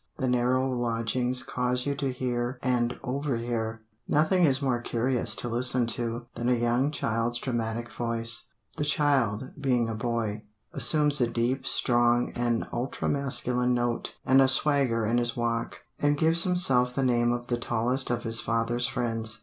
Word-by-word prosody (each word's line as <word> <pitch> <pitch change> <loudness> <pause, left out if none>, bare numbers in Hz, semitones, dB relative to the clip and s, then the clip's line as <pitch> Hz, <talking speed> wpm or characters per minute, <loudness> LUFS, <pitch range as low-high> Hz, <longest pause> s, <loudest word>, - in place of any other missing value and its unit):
The 130 - -1
narrow 125 +1 +1
lodgings 120 0 -1
cause 125 0 -2
you 140 - 0
to 135 -2 -1
hear 125 0 -2
and 125 -1 0
overhear. 120 -4 -3 0.2
Nothing 170 +4 +3
is 135 -3 +2
more 130 -4 0
curious 120 +1 0
to - - -2
listen 120 +1 +1
to 120 0 -4
than 120 +1 -2
a 125 - +4
young 120 +4 +1
child's 120 -4 -1
dramatic 120 -2 -3
voice. 115 -2 -2 0.3
The - - -1
child, 135 -5 +1
being 125 -4 +1
a - - -2
boy, 110 -2 -2 0.3
assumes 150 -2 +3
a 120 - +3
deep, 120 +3 -1
strong, 120 0 +2
and 120 -1 -1
ultra 120 +3 -3
masculine 125 -3 0
note, 120 -1 -2
and 135 +1 +5
a 135 - +5
swagger 130 -5 +2
in 115 +3 +2
his 120 0 -2
walk, 120 0 -2 0.2
and 145 0 +2
gives 165 +2 +3
himself 130 -9 +3
the 135 - 0
name 120 -2 +2
of 120 0 -3
the 120 -1 -2
tallest 120 +3 0
of 120 -1 -1
his 115 0 -2
father's 115 +1 +1
friends. 115 -4 -3
120 Hz, 165 wpm, -27 LUFS, 120-130 Hz, 0.3 s, and